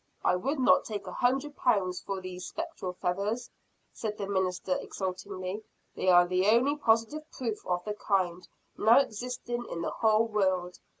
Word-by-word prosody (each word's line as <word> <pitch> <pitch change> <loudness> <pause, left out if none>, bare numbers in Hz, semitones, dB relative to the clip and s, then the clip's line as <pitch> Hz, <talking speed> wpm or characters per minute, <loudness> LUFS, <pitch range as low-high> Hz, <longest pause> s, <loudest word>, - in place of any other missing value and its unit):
"I - - +4
would 275 +12 -1
not 255 - +5
take 210 -2 -5
a - - -6
hundred 270 +4 0
pounds 190 -7 +1
for 195 -1 -4
these 180 0 -6
spectral 325 - -5
feathers," 200 +7 -2 0.4
said 210 -2 -4
the 200 - -3
minister 190 -1 0
exultingly. 190 +1 -5 0.3
"They 185 - +1
are 175 -1 +7
the 185 +2 +1
only 245 +7 +4
positive 265 +4 +1
proof 230 -4 -4
of 180 -1 -1
the 210 - -2
kind, 185 -4 -1 0.3
now 225 +2 +6
existing 245 -1 -1
in 170 - -4
the - - -2
whole 220 0 +3
world. 190 -4 0
205 Hz, 165 wpm, -29 LUFS, 185-240 Hz, 0.4 s, are